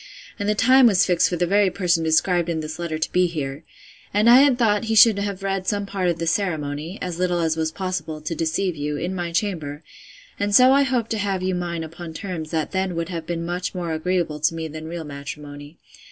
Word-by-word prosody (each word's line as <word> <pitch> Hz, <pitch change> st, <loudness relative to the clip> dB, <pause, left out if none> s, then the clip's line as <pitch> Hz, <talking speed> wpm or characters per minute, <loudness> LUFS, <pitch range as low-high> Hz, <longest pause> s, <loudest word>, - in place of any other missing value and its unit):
and 205 Hz, +1 st, -1 dB
the 210 Hz, -, +2 dB
time 255 Hz, +4 st, +6 dB
was 195 Hz, -4 st, +4 dB
fixed 180 Hz, -2 st, +2 dB
for 175 Hz, -, -2 dB
the 175 Hz, +1 st, +1 dB
very 200 Hz, +2 st, +3 dB
person 175 Hz, -3 st, 0 dB
described 170 Hz, +2 st, +2 dB
in 165 Hz, -1 st, -1 dB
this 155 Hz, +1 st, -7 dB
letter 170 Hz, -2 st, -3 dB
to 160 Hz, -, -2 dB
be 180 Hz, 0 st, +3 dB
here; 145 Hz, -3 st, -5 dB, 0.5 s
and 210 Hz, +3 st, +2 dB
I 245 Hz, -, +9 dB
had 275 Hz, -3 st, +4 dB
thought 215 Hz, -3 st, +2 dB
he 225 Hz, 0 st, 0 dB
should 220 Hz, -2 st, +7 dB
have 200 Hz, -1 st, -4 dB
read 195 Hz, -1 st, -2 dB
some 205 Hz, -1 st, 0 dB
part 195 Hz, -2 st, -1 dB
of 170 Hz, -, -1 dB
the 165 Hz, -, -3 dB
ceremony 160 Hz, -1 st, -2 dB
(as 180 Hz, -2 st, -4 dB
little 180 Hz, -1 st, +1 dB
as 160 Hz, -1 st, +1 dB
was 160 Hz, -1 st, -1 dB
possible, 180 Hz, -4 st, -4 dB
to 155 Hz, +2 st, -4 dB
deceive 165 Hz, +3 st, -1 dB
you) 145 Hz, 0 st, -3 dB
in 175 Hz, +5 st, -3 dB
my 175 Hz, -2 st, -3 dB
chamber; 165 Hz, -5 st, -3 dB, 0.6 s
and 205 Hz, 0 st, +1 dB
so 255 Hz, +3 st, +7 dB
I 280 Hz, -, +5 dB
hoped 250 Hz, -4 st, 0 dB
to 220 Hz, -, -1 dB
have 195 Hz, -2 st, -1 dB
you 185 Hz, 0 st, 0 dB
mine 170 Hz, -2 st, -3 dB
upon 160 Hz, 0 st, -9 dB
terms 175 Hz, -6 st, -5 dB
that 160 Hz, -2 st, -2 dB
then 190 Hz, -2 st, -1 dB
would 165 Hz, +1 st, -3 dB
have 165 Hz, -3 st, -5 dB
been 170 Hz, -1 st, -3 dB
much 180 Hz, +2 st, -3 dB
more 170 Hz, -3 st, -3 dB
agreeable 160 Hz, -1 st, -1 dB
to 155 Hz, +2 st, +1 dB
me 160 Hz, -1 st, -4 dB
than 155 Hz, +1 st, -8 dB
real 170 Hz, 0 st, -5 dB
matrimony. 145 Hz, +1 st, -9 dB
175 Hz, 235 wpm, -22 LUFS, 160-195 Hz, 0.6 s, I